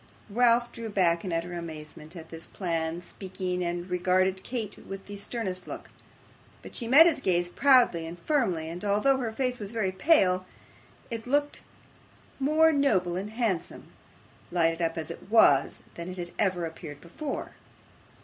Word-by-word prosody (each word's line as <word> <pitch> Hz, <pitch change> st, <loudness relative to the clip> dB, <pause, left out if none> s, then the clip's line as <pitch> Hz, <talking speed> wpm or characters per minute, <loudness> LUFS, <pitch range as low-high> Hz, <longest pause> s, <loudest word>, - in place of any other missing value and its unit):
Ralph 240 Hz, +1 st, +3 dB
drew 230 Hz, -1 st, -6 dB
back 175 Hz, -4 st, +2 dB
in 185 Hz, -, -4 dB
utter 170 Hz, +1 st, -2 dB
amazement 155 Hz, -1 st, -8 dB
at 165 Hz, -2 st, -10 dB
this 165 Hz, 0 st, -8 dB
plain 165 Hz, -2 st, -3 dB
speaking, 180 Hz, -1 st, -4 dB
and 175 Hz, +1 st, -3 dB
regarded 185 Hz, +1 st, +1 dB
Kate 225 Hz, -5 st, -4 dB
with 195 Hz, 0 st, -9 dB
the 205 Hz, -, -8 dB
sternest 200 Hz, -3 st, -4 dB
look. -, -, -8 dB, 0.7 s
But -, -, -11 dB
she 235 Hz, -, -4 dB
met 285 Hz, +7 st, +8 dB
his 325 Hz, -5 st, +2 dB
gaze 175 Hz, -4 st, +1 dB
proudly 245 Hz, -9 st, +4 dB
and 170 Hz, +2 st, -8 dB
firmly, 185 Hz, -, 0 dB
and 175 Hz, +4 st, -6 dB
although 210 Hz, +7 st, +3 dB
her 240 Hz, -4 st, -2 dB
face 250 Hz, +1 st, -2 dB
was 205 Hz, -1 st, -6 dB
very 215 Hz, -5 st, -1 dB
pale, 185 Hz, -, +3 dB, 0.6 s
it 230 Hz, 0 st, -5 dB
looked 290 Hz, +2 st, 0 dB, 0.8 s
more 310 Hz, +4 st, +4 dB
noble 190 Hz, -, +2 dB
and 195 Hz, +3 st, -3 dB
handsome, 220 Hz, -6 st, -3 dB, 0.6 s
lighted 165 Hz, -1 st, +1 dB
up 165 Hz, 0 st, -1 dB
as 160 Hz, -, -4 dB
it -, -, -11 dB
was, 145 Hz, -11 st, +4 dB
than 170 Hz, +1 st, -7 dB
it 185 Hz, -, -7 dB
had 175 Hz, -1 st, -5 dB
ever 185 Hz, -4 st, +1 dB
appeared 160 Hz, -3 st, -8 dB
before. 275 Hz, -, -6 dB
185 Hz, 160 wpm, -28 LUFS, 170-235 Hz, 0.8 s, met